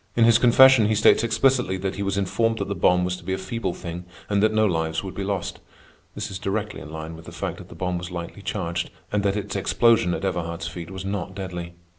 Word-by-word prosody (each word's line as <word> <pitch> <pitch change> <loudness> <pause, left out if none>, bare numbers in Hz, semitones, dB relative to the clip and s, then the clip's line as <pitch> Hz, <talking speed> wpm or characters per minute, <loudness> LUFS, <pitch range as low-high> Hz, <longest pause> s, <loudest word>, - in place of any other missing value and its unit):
In 115 - +5
his 115 -1 +6
confession 125 -1 +7
he 110 - +2
states 105 +1 +5
explicitly 120 -3 +2
that 95 +1 -2
he 100 - -5
was 100 -1 -1
informed 105 +4 +1
that 100 - -3
the 100 - -2
bomb 90 0 +3
was 90 0 -1
to - - -14
be 95 - -2
a - - -1
feeble 95 0 -3
thing 85 0 -7 0.2
and 100 -1 +2
that 110 +1 +4
no 110 0 +3
lives 80 -3 0
would 95 - -6
be 100 - -4
lost. 95 -2 -3 0.6
This - - -4
is 95 - -5
directly 105 +2 -3
in - - -9
line 80 +1 -6
with 80 0 -12
the - - -9
fact - - -4
that - - -12
the - - -11
bomb 90 -1 -2
was 90 0 -6
lightly 85 -2 -6
charged, 85 +1 -3 0.2
and 105 - +1
that 100 0 +1
its 100 -1 -4
explosion 100 -1 +3
at - - -4
Everhard's 85 -3 -3
feet 85 -1 -7
was 95 0 -7
not 95 -1 -3
deadly. 90 -3 -6
95 Hz, 250 wpm, -24 LUFS, 90-105 Hz, 0.6 s, confession